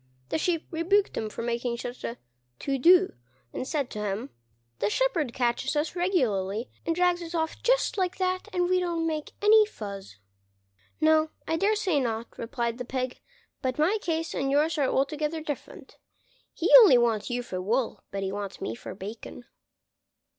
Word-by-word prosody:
The - - 0
Sheep 335 -1 0
rebuked 365 +5 +2
him 220 - -2
for 220 - -6
making 235 0 -2
such 245 +1 -7
a 235 - -4 0.4
to 275 - -2
do, 365 +6 +6 0.4
and 255 - -4
said 285 -5 -2
to 210 - -5
him, 200 -7 -3 0.5
"The 200 - +1
shepherd 335 - +1
catches 245 +3 0
us 300 +3 -1
regularly 235 - 0 0.2
and 330 - +1
drags 355 0 +2
us 340 0 -6
off 320 -1 -2
just - - +2
like 360 -1 0
that, 370 0 -1
and 355 -1 +1
we 365 0 +3
don't 340 -2 -1
make 310 -2 -3
any 430 +1 +7
fuss." 200 - -8 0.8
"No, 315 0 +4 0.2
I 325 - +1
dare 405 +6 +2
say 380 -8 +1
not," 230 -3 -3
replied 235 0 -3
the - - -2
Pig, 255 0 -3 0.4
"but 255 -2 -1
my 355 +8 +2
case 330 -3 -2
and 270 0 -1
yours 305 +3 +2
are 275 - +3
altogether 300 +3 0
different: 300 -2 -7 0.5
he - - -1
only 395 - +8
wants 230 -2 +1
you 245 0 -2
for 185 -6 -5
wool, 230 +6 -1
but 195 0 -4
he 190 - -2
wants 200 -1 -5
me - - -3
for - - -8
bacon." 210 +5 -8
290 Hz, 175 wpm, -27 LUFS, 235-345 Hz, 0.8 s, only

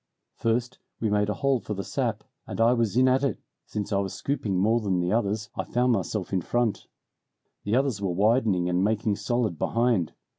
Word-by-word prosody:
"First 120 +2 -1 0.2
we 110 -2 0
made 105 0 +2
a 105 - -1
hole 140 -2 +1
for 105 - -5
the 100 - -4
sap, - - -2 0.2
and - - -6
I 115 +2 +5
was 115 -2 0
in 130 +1 +5
at 130 +1 +3
it, 140 - 0 0.3
since 105 0 -4
I 100 - +2
was 95 -1 -3
scooping 110 -9 -2
more 110 +5 +3
than 95 -5 0
the 90 0 0
others 105 -1 0
I - - -2
found 125 +1 +1
myself 100 -2 -2
in 95 - +2
front. 120 +4 -1 0.8
The 105 +3 +1
others 130 -6 +1
were 100 - 0
widening 100 -1 +2
and 90 +1 +1
making 105 0 +1
solid 120 -9 -1
behind. 115 -7 +1
110 Hz, 200 wpm, -26 LUFS, 100-120 Hz, 0.8 s, I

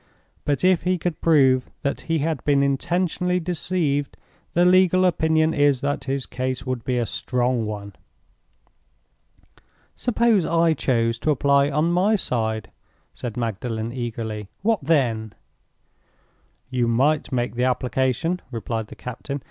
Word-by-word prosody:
But 145 +2 0
if 185 -2 +4
he 185 +1 +1
could 170 -1 -3
prove 135 -6 +4
that 140 - -1
he 165 0 -1
had 155 -1 -2
been 140 -1 +3
intentionally 180 +5 0
deceived, 160 -5 -1 0.4
the 175 +1 +4
legal 185 0 +5
opinion 160 -2 +2
is 145 -4 +3
that 145 0 -2
his 135 -1 -2
case 130 0 -3
would 130 -3 -3
be 125 +1 -1
a 120 - +1
strong 125 -1 -1
one." 100 -1 -6 2.0
"Suppose 235 -5 +2
I 165 0 +3
chose 115 -5 0
to 155 - -1
apply 140 0 +3
on 150 +4 +1
my 190 +5 +3
side?" 110 - -2 0.4
said 120 -2 -6
Magdalen, 115 0 -3
eagerly. 110 -4 -5
"What 220 -6 +1
then?" 120 -8 +1 1.4
"You 125 -2 +1
might 140 +6 +1
make 120 -2 -1
the 125 +1 0
application," 130 +7 0
replied 115 -2 -4
the - - -11
captain. 130 +3 -6
140 Hz, 135 wpm, -23 LUFS, 120-165 Hz, 2.0 s, legal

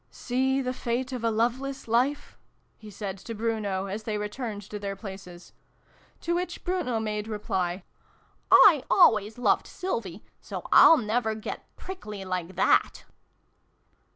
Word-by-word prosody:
"Seethe 260 +1 -1
fate 250 +3 -2
of 245 -2 -5
a 230 - +2
loveless 245 +5 -1
life! 250 +6 0 0.2
" - - -42
he 215 - -11
said 195 -1 -6
to 230 +4 -7
Bruno, 210 -4 -2
as 200 +3 -5
they 215 -1 -3
returned 210 0 -5
to 210 +2 -7
their 200 -1 -4
places. 190 -4 -10 0.7
To 340 - -1
which 350 0 -3
Bruno 345 -11 -1
made 210 -1 -3
reply, 190 -4 -2 0.4
" - - -34
I 320 -10 +8
always 220 - +4
loved 245 - +2
Sylvie, 220 - -5 0.2
so - - -7
I'll 325 - +8
never 220 -2 -1
get 215 - -7
prickly 210 - -8
like 185 -1 -4
that 190 - +2
220 Hz, 145 wpm, -27 LUFS, 200-255 Hz, 0.7 s, I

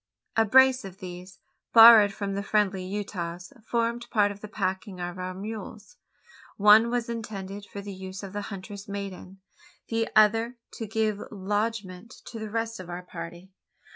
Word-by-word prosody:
A 225 - +4
brace 260 +3 +5
of 190 -1 -9
these, 180 0 -9 0.4
borrowed 225 -3 +10
from 195 0 -4
the 200 - -2
friendly 200 -2 +1
Utahs, 185 -1 -5
formed 235 +1 -1
part 205 -2 +3
of 205 0 -10
the 210 - -7
packing 190 -1 -3
of 175 +1 -5
our 185 0 -4
mules. 210 +1 -8 0.6
One 210 +3 +7
was 240 -1 -1
intended 205 -3 -6
for 200 - -6
the 200 0 -7
use 190 +1 -8
of 195 -1 -8
the 205 - -3
huntress 200 0 -8
maiden 195 -1 -7 0.5
the 225 0 0
other 225 +3 +4 0.2
to 225 - -6
give 215 -1 -1
lodgment 205 +1 -3
to 230 - -8
the 220 -1 -5
rest 225 +1 -3
of 180 -2 -9
our 175 +1 -6
party. 175 +1 -9
205 Hz, 165 wpm, -27 LUFS, 190-225 Hz, 0.6 s, borrowed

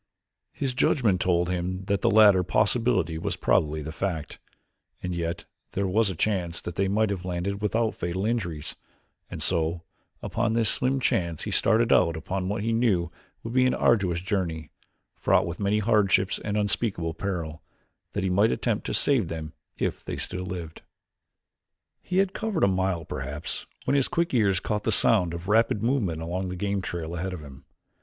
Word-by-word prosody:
His 135 -3 -3
judgment 115 -7 +2
told 85 -1 +2
him 90 +1 -3
that 100 -1 0
the - - +3
latter 105 -3 +6
possibility 105 -4 +1
was - - -2
probably 75 0 +1
the 80 - -5
fact, 80 -3 -4 0.6
and 90 0 -2
yet 85 0 -3 0.3
there 100 - 0
was 100 +3 +2
a 95 - -4
chance 85 -2 -1
that 85 - -6
they 95 +3 0
might 105 +2 +1
have 95 -3 -3
landed 95 +3 -3
without 110 +2 +1
fatal 90 +3 -3
injuries, 85 -10 -2 0.5
and - - -2
so 85 -1 +1 0.4
upon 115 - 0
this 115 -2 +3
slim 135 +1 +2
chance 85 - 0
he - - -4
started 115 +1 +3
out 85 -2 +3
upon 95 +3 -3
what 100 0 -2
he 115 +1 0
knew 110 -7 +1 0.3
would 115 - -5
be 130 0 +4
an - - +1
arduous 95 -7 +2
journey, 90 -5 -2 0.4
fraught - - +2
with 85 0 -5
many 100 +1 +1
hardships 100 -3 +2
and 105 0 -1
unspeakable 100 -5 0
peril, 80 -4 -4 0.5
that 100 - -2
he 95 - +1
might 100 +5 +4
attempt 115 -4 -1
to - - -1
save 130 -10 +2
them 80 -1 -6 0.2
if - - -2
they - - -5
still 90 0 -4
lived. 85 -3 -6 1.2
He 185 - -3
had 195 -1 +2
covered 215 -7 -1
a - - +6
mile 95 -3 0
perhaps 65 +4 -3 0.2
when - - +1
his 135 -2 +4
quick 170 -3 -1
ears 100 -7 +3
caught 105 +2 -2
the 110 - +1
sound 100 -4 +3
of 85 +2 -7
rapid 110 0 +2
movement 105 - 0
along 90 +3 -3
the 90 - -4
game 100 +1 -1
trail 85 -2 -4
ahead 90 +2 -3
of 90 - -7
him. 70 -2 -12
95 Hz, 180 wpm, -26 LUFS, 85-110 Hz, 1.2 s, latter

